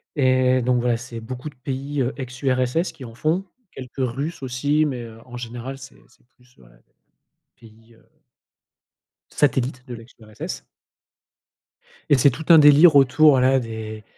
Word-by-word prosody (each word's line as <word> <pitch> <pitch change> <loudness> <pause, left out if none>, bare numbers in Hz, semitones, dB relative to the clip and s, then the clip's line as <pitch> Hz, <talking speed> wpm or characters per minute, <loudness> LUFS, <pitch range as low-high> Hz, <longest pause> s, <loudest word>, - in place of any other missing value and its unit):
et 130 -2 +2
donc 125 0 +1
voilà, 120 -1 0
c'est 120 -1 -9
beaucoup 125 +5 -7
de 145 - -20
pays, 135 +2 -4
heu, 125 0 -1
ex-URSS 130 +4 -2
qui 150 - -12
en 115 - -11
font, 165 +9 -1 0.3
quelques 130 -2 -10
Russes 135 +6 -3
aussi, 145 +4 0
mais 130 -5 -4
heu, 115 -1 -12
en 125 - -12
général, 120 +3 -7
c'est 135 +1 -14
c'est 120 - -29
plus, 125 0 -27
heu, 65 - -20 0.9
pays, 115 0 -20
heu 115 - -25 1.3
satellites 130 -2 -1
de 125 - -7
l'ex-URSS. 115 -2 -9 1.5
Et 145 - +5
c'est 130 +3 +5
tout 155 +6 -8
un 165 - +9
délire 150 +2 +7
autour, 140 +3 +5
voilà, 130 0 +3
des 110 -2 -7
130 Hz, 150 wpm, -22 LUFS, 120-140 Hz, 1.5 s, un